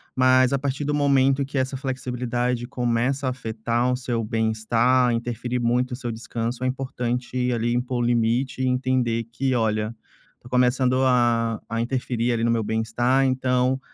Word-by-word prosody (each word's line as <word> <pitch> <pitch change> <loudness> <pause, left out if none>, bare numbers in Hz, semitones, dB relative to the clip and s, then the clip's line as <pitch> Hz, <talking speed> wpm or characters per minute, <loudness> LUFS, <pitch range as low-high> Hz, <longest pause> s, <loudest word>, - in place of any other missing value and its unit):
mas, 130 0 +4
a 140 - +1
partir 140 +1 -2
do 150 - 0
momento 140 -1 +3
que 140 +1 -5
essa 130 +1 0
flexibilidade 125 -2 -2
começa 125 +2 -1
a - - +2
afetar 115 0 -1
o - - +1
seu 120 -2 -2
bem-estar, 115 +3 +2
interferir 120 +1 -2
muito 125 +2 +1
no - - -2
seu 120 -2 -4
descanso, 115 +2 -4
é - - +1
importante 125 -1 -2
ali 120 0 0
impor 125 +1 -1
o 120 - +1
limite 120 +3 +1
e 130 - +1
entender 125 -3 0
que: 130 +2 -1
"Olha, 110 -1 0 0.4
estou 120 - -16
começando 125 +1 +2
a 120 -3 +2
a 115 +1 -1
interferir 125 -1 -1
ali 115 -1 -1
no 115 - +2
meu 115 -1 +1
bem-estar. 115 +5 +1
Então, 130 0 +1
125 Hz, 170 wpm, -24 LUFS, 115-130 Hz, 0.4 s, mas